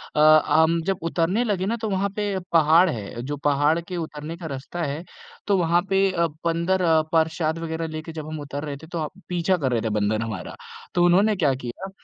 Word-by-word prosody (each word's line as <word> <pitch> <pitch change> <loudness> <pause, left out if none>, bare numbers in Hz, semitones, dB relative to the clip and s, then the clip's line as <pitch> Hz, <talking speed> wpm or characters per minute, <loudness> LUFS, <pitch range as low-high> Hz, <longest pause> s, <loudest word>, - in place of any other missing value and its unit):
अ, - - +1 0.3
हम 160 +1 +3
जब 195 -1 0
उतरने 180 +8 +1
लगे 200 -5 -1
ना, 225 - 0
तो 220 -1 -3
वहाँ 195 0 0
पे 205 -2 -1
पहाड़ 165 +2 +5
है। 115 -3 -5
जो 145 +4 -4
पहाड़ 145 +3 +2
के 175 +1 -6
उतरने 160 0 -6
का 170 - -9
रास्ता 150 +4 -5
है 150 +3 -3 0.4
तो 200 -2 +3
वहाँ 170 0 +3
पे 195 0 +3
अ, 170 -2 +1 0.2
बंदर 170 +3 +1 0.3
प्रसाद 160 0 +1
वगैरह 165 0 -3
लेके 155 +1 -6
जब 155 -2 -7
हम 155 0 -5
उतर 145 0 -6
रहे 145 -2 -5
थे, 160 +3 -13
तो 165 -2 -3 0.2
पीछा 180 +1 +1
कर 135 -6 -1
रहे 115 -2 +1
थे 110 - -1
बन्दर 105 +1 0
हमारा। 110 -5 -5 0.4
तो 175 - +4
उन्होंने 195 +5 +4
क्या 150 -8 +2
किया, 125 +11 -6
165 Hz, 210 wpm, -24 LUFS, 150-180 Hz, 0.4 s, पहाड़